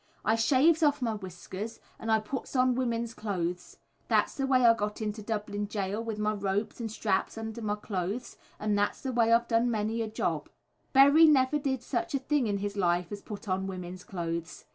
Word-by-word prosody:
"I 220 - +4
shaves 285 +8 +4
off 290 -3 +3
my 230 -2 0
whiskers 190 +2 -7 0.2
and 225 - -2
I 220 - +5
puts 235 +6 -6
on 255 0 +4
women's 235 -2 -1
clothes. 180 -5 -4 0.3
That's - - +2
th' 270 -2 -1
way 255 -2 +4
I 230 - +8
got 210 -1 -3
into 215 0 -3
Dublin 205 -1 -3
Jail, 205 +1 -2
with 225 -2 -4
my 210 0 0
ropes 200 +2 -2
and 225 -2 -4
straps 205 -1 -1
under 225 +1 -5
my 210 -1 -1
clothes, 205 +2 -4 0.2
and 210 -1 0
that's 205 +6 0
th' 260 -2 -2
way 230 -1 +3
I've 235 +1 +4
done 230 +1 +2
many 220 0 -1
a 225 - -1
job." 215 - -2 0.4
Berry 285 +4 +7
never 285 0 +4
did 265 -4 -2
such 340 +4 -2
a - - +4
thing 275 -2 +1
in 205 -1 0
his 205 0 -3
life 175 -2 +1
as 205 0 -5
put 210 +1 -8
on 190 0 -1
women's 180 -1 -6
clothes. 170 -2 -5
220 Hz, 205 wpm, -29 LUFS, 200-245 Hz, 0.4 s, I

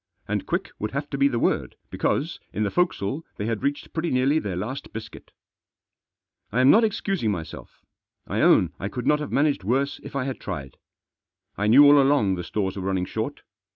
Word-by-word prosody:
And 105 -1 -2
quick - - -2
would 105 +2 -3
have 140 +2 -4
to 140 - -2
be 140 - +5
the 120 - -1
word, - - 0 0.2
because, - - -1
in 110 - -1
the 100 - -1
forecastle 160 - 0
they 105 - -3
had 115 -1 -2
reached 145 +1 -3
pretty 165 +1 -1
nearly 135 +4 +2
their 100 - -4
last 110 +10 -5
biscuit. 115 - -9 1.2
I 115 - 0
am 130 +2 +7
not 225 - +6
excusing 195 - 0
myself. 85 -6 -7 0.4
I - - -1
own - - +4
I 100 - -3
could 125 +2 -5
not 150 0 +3
have 150 - -5
managed 140 -8 +1
worse 135 +7 0
if - - -10
I 135 - 0
had 135 0 -4
tried. 70 -9 -6 0.8
I 105 - -1
knew 135 +7 +8
all 145 0 +7
along 135 -8 +3
the 90 -1 -4
stores 95 +1 -2
were 100 - -5
running 95 -1 -1
short. - - -4
125 Hz, 200 wpm, -24 LUFS, 100-145 Hz, 1.2 s, knew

